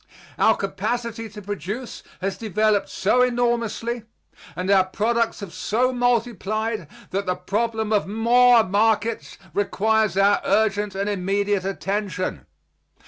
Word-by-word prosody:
Our - - +4
capacity 235 -2 -3
to 210 0 -10
produce 205 +5 -5 0.2
has 195 +1 -1
developed 215 -1 +1
so 225 +6 +2
enormously 240 -1 0 0.5
and 185 +2 -1
our 190 -2 +5
products 230 +4 0
have 195 -4 -7
so 250 +4 0
multiplied 225 - -1 0.2
that 195 +1 -2
the 180 - +1
problem 220 +4 -1
of 205 - +1
more 235 +3 +5
markets 220 +3 0 0.2
requires 215 0 +1
our 200 +1 +4
urgent 205 -1 +1
and 200 +1 -1
immediate 200 0 0
attention. 195 -1 -3
215 Hz, 120 wpm, -23 LUFS, 195-230 Hz, 0.5 s, our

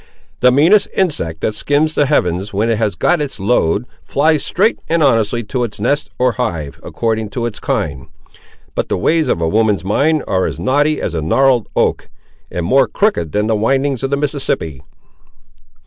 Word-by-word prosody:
"The 125 - +5
meanest 165 +11 +4
insect 85 - -1
that 110 - 0
skims 150 +6 0
the 145 - +2
heavens, 95 - 0
when 110 +4 0
it 110 - 0
has 105 -3 0
got 175 -3 +1
its 140 -6 -4
load, 100 0 +1 0.2
flies 150 +1 +1
straight 210 +5 +1
and 165 -1 +2
honestly 115 -3 +2
to 125 +3 -2
its 115 -4 -5
nest 145 +1 0
or 125 0 +2
hive, 85 - -4
according 110 -2 -2
to 120 - -1
its 115 -3 -5
kind; 70 -4 -3 0.7
but - - -2
the - - 0
ways 160 - +1
of 85 - 0
a 80 - +1
woman's 105 -1 +1
mind 150 +10 +1
are 95 -1 0
as - - -5
knotty 145 +3 +1
as - - -3
a 80 - -2
gnarled 125 - +2
oak, - - 0 0.4
and 85 - -3
more 130 +6 +3
crooked 105 - 0
than 105 +1 0
the 110 0 +1
windings 135 +4 0
of 135 - -2
the 140 - 0
Mississippi!" 135 - -2
120 Hz, 185 wpm, -16 LUFS, 100-145 Hz, 0.7 s, The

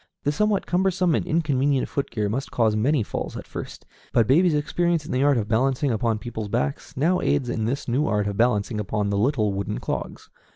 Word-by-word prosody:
This 145 +1 0
somewhat 210 0 +1
cumbersome 180 -1 +1
and - - 0
inconvenient 145 -4 +1
foot 140 -3 -3
gear 105 -2 -1
must 130 +7 -3
cause 110 -3 +1
many 125 +4 +2
falls - - -5
at - - -8
first, - - -8 0.3
but 115 - +3
baby's 160 - +4
experience 165 +2 0
in - - -6
the 130 - +1
art 140 -1 +4
of 105 -3 -1
balancing 130 +4 +1
upon 115 0 0
people's 110 -1 -5
backs 70 - -3
now 170 +7 +2
aids 140 -4 +1
in 110 -2 -1
this 135 +5 -2
new 130 +5 +1
art 105 -1 +1
of 100 -1 -2
balancing 110 -1 +1
upon 105 0 -1
the 100 - 0
little 110 -4 +1
wooden 100 +2 -3
clogs. - - -5
125 Hz, 210 wpm, -24 LUFS, 110-150 Hz, 0.3 s, baby's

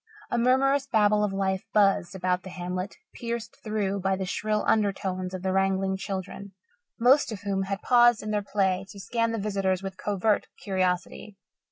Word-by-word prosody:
A - - +1
murmurous 270 +3 +3
babble 210 -3 +3
of 205 - 0
life 190 -1 -1
buzzed 195 -3 +3
about 180 -1 0
the 190 - -9
hamlet, 180 +2 -4 0.2
pierced 235 -1 -5
through 205 -2 -1
by 195 0 +1
the 190 0 -3
shrill 210 +3 -1
undertones 190 -3 0
of 185 -1 -6
the 190 0 0
wrangling 195 0 +1
children, 195 0 -6 0.5
most 250 +3 +4
of 210 - -6
whom 195 -1 -1
had 195 +1 -4
paused 240 -2 +5
in 215 - -3
their 210 -1 +1
play 195 -2 0
to 200 - -11
scan 230 +4 -1
the 230 - -2
visitors 195 -2 -1
with 190 -1 -6
covert 205 +1 +1 0.2
curiosity. 185 +1 -2
195 Hz, 175 wpm, -27 LUFS, 190-215 Hz, 0.5 s, paused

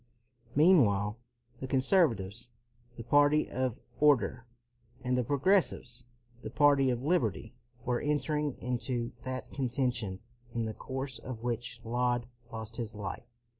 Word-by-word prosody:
Meanwhile 115 - +4 0.4
the 130 - -5
conservatives, 125 - +2 0.5
the 115 - -7
party 145 +4 +4
of 130 0 -1 0.2
order, 135 -4 +3 0.6
and 125 0 +1
the 125 - +2
progressives, 140 - +1 0.4
the 110 - -6
party 140 +1 +4
of 125 0 -1
liberty, 120 - 0 0.3
were 120 -1 0
entering 150 -1 0
into 120 -1 -2
that 130 0 -5
conten 130 -1 0
tion 100 -6 -4 0.4
in 115 -1 0
the 110 - -3
course 130 0 -5
of 120 -1 -7
which 120 -1 -3
Laud 120 +1 0 0.3
lost 110 0 -7
his 115 -2 -4
life. 105 +2 -6
125 Hz, 130 wpm, -31 LUFS, 115-140 Hz, 0.6 s, Meanwhile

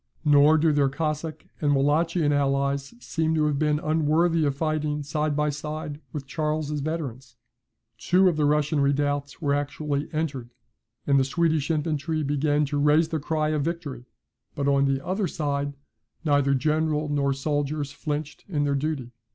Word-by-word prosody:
Nor 145 +1 +6
do 160 +1 +3
their 140 -2 +3
Cossack 155 +2 -3 0.2
and 145 -2 +3
Wallachian 150 +2 +2
allies 140 +3 0
seem 160 -8 -1
to 155 -1 +2
have 145 -2 0
been 150 -1 +2
unworthy 160 +2 +2
of 140 -1 0
fighting 150 -1 -1
side 150 +1 -1
by 150 0 +1
side 150 0 -5
with 145 -3 -5
Charles's 150 +1 -2
veterans. 135 -5 -5 0.6
Two 185 +8 +4
of 175 - +2
the 150 -1 +1
Russian 150 0 +2
redoubts 145 +2 0
were 140 -1 +2
actually 145 0 -2
entered, 145 -6 -3 0.6
and 140 -1 +4
the - - +4
Swedish 160 +1 0
infantry 155 0 -1
began 145 +1 +1
to 145 +1 -2
raise 150 +2 +4
the 160 - -1
cry 155 +1 -1
of 155 -1 0
victory. 150 -6 -4 0.5
But 140 0 -1
on 140 0 +3
the 135 0 -1
other 190 +1 0
side, 145 -2 -2 0.5
neither 145 -2 +3
general 155 +2 0
nor 140 -1 +1
soldiers 145 +1 -2
flinched 150 0 -4
in 150 -5 0
their 145 -1 +1
duty. 140 -3 -2
150 Hz, 160 wpm, -25 LUFS, 140-155 Hz, 0.6 s, Nor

